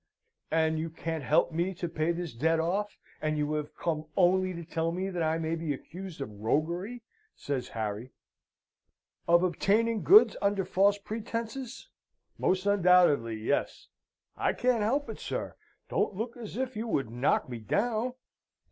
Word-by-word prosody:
"And 160 0 +2
you 165 +1 -2
can't 160 -1 -4
help 150 +6 +3
me 175 +4 -1
to 175 - -3
pay 165 0 0
this 170 -3 -4
debt 160 +7 +1
off, 195 +6 -1 0.2
and 155 0 0
you 150 0 0
have 150 -1 -3
come 155 -2 -2
only 185 +1 +4
to 170 -2 -7
tell 165 0 -1
me 185 +3 -3
that 175 -2 -3
I 160 0 +1
may 160 0 -2
be 160 -3 -2
accused 180 +2 -9
of 105 -6 -7
roguery?" 175 - -1 0.3
says 135 -3 -3
Harry. 110 +2 -4 1.2
"Of 170 +1 +5
obtaining 210 +6 +2
goods 420 +3 +7
under 200 -1 +1
false 200 +2 +3
pretences? 230 +4 -5 0.5
Most 185 +1 +1
undoubtedly, 180 - +4
yes. 110 +6 -2 0.5
I - - +1
can't 245 -3 +1
help 275 +8 +1
it, - - -7
sir. - - -4 0.3
Don't 205 - 0
look 230 +4 -4
as 230 -3 -8
if 260 0 -2
you 220 +2 -3
would 135 - -1
knock 120 +4 +1
me 120 -2 -6
down. 220 - 0
175 Hz, 160 wpm, -29 LUFS, 155-205 Hz, 1.2 s, goods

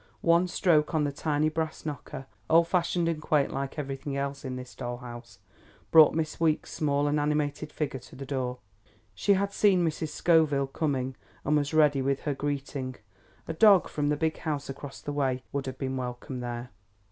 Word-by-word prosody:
One 170 +2 +4
stroke 165 -3 +2
on 155 - +3
the 145 - 0
tiny 150 +1 0
brass 160 0 -3
knocker, 145 -2 -6 0.2
old 165 +1 +5
fashioned 170 -1 +1
and 165 -2 -1
quaint 150 -2 +1
like 135 +2 -4
everything 140 -1 -4
else 140 0 -3
in 130 -2 -4
this 125 0 -8
doll 120 0 -5
house, 120 -2 -10 0.5
brought 160 -2 +8
Miss 155 -1 -2
Weeks' 160 -2 +1
small 145 -1 +1
and 150 +1 +1
animated 150 0 -1
figure 145 -4 -3
to 125 - -15
the 135 - -7
door. 130 -2 -2 0.6
She 100 - +2
had 200 +1 -1
seen 190 -4 +4
Mrs. 160 -1 -2
Scoville 155 -3 +3
coming, 135 -2 -2 0.3
and 150 - +2
was 145 -1 +1
ready 150 -3 +4
with 135 +1 0
her 145 - -1
greeting. 140 -2 -3 0.5
A 160 - -2
dog 195 +2 +6
from 145 -1 -1
the 150 - +1
big 160 0 0
house 145 -3 -3
across 135 0 -9
the 145 - -4
way 130 -3 0
would 140 -1 -3
have 130 0 -5
been 130 -1 -3
welcomed 125 0 -5
there. 120 0 -5
145 Hz, 190 wpm, -28 LUFS, 135-155 Hz, 0.6 s, brought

